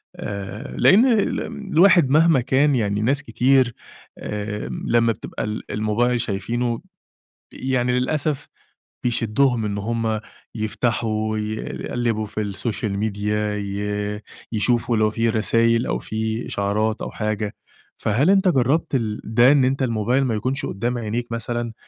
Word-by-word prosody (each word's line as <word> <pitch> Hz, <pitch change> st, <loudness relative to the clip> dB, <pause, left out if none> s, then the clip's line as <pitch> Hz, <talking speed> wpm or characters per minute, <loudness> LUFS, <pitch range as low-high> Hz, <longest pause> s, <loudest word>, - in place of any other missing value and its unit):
آآ، 100 Hz, +5 st, -6 dB
لإن 215 Hz, +7 st, +6 dB
ال 225 Hz, -6 st, +2 dB, 0.3 s
الواحد 175 Hz, -4 st, +6 dB
مهما 155 Hz, -1 st, +5 dB
كان 135 Hz, +3 st, +2 dB
يعني 105 Hz, -3 st, 0 dB
ناس 135 Hz, +5 st, +1 dB
كتير 125 Hz, +1 st, +2 dB, 0.4 s
آآ 105 Hz, 0 st, -4 dB, 0.2 s
لما 115 Hz, 0 st, +3 dB
بتبقى -, -, -6 dB
ال 105 Hz, 0 st, -5 dB
الموبايل 115 Hz, +3 st, +1 dB
شايفينه 120 Hz, +3 st, -2 dB, 0.7 s
يعني 125 Hz, -1 st, 0 dB
للأسف 140 Hz, +3 st, -1 dB, 0.6 s
بيشدهم 120 Hz, 0 st, +1 dB
إن 100 Hz, -1 st, -2 dB
هُم 110 Hz, +1 st, -1 dB, 0.4 s
يفتحوا، 110 Hz, -1 st, -1 dB
ي -, -, -1 dB
يقلّبوا 115 Hz, -1 st, -2 dB
في 110 Hz, -, -4 dB
السوشيال 105 Hz, +1 st, -3 dB
ميديا، 105 Hz, 0 st, -1 dB
ي 105 Hz, +1 st, -3 dB, 0.3 s
يشوفوا 115 Hz, +1 st, +1 dB
لو 110 Hz, 0 st, +3 dB
في 115 Hz, +1 st, +1 dB
رسايل 115 Hz, +1 st, +2 dB
أو -, -, -1 dB
في 110 Hz, +1 st, -3 dB
إشعارات 105 Hz, +2 st, -1 dB
أو -, -, -4 dB
حاجة. 105 Hz, -1 st, -3 dB, 0.4 s
فهل 125 Hz, -, +1 dB
أنت 195 Hz, 0 st, +4 dB
جربت 140 Hz, -1 st, +2 dB
ال 110 Hz, -4 st, -1 dB
ده، 120 Hz, +4 st, +5 dB
إن 140 Hz, -3 st, +4 dB
أنت 135 Hz, +1 st, 0 dB
الموبايل 120 Hz, +3 st, +1 dB
ما 115 Hz, -4 st, 0 dB
يكونش 130 Hz, +6 st, -2 dB
قدّام 120 Hz, +5 st, -2 dB
عينيك 115 Hz, +2 st, -3 dB
مثلًا؟ 115 Hz, 0 st, -3 dB
115 Hz, 135 wpm, -22 LUFS, 105-125 Hz, 0.7 s, لإن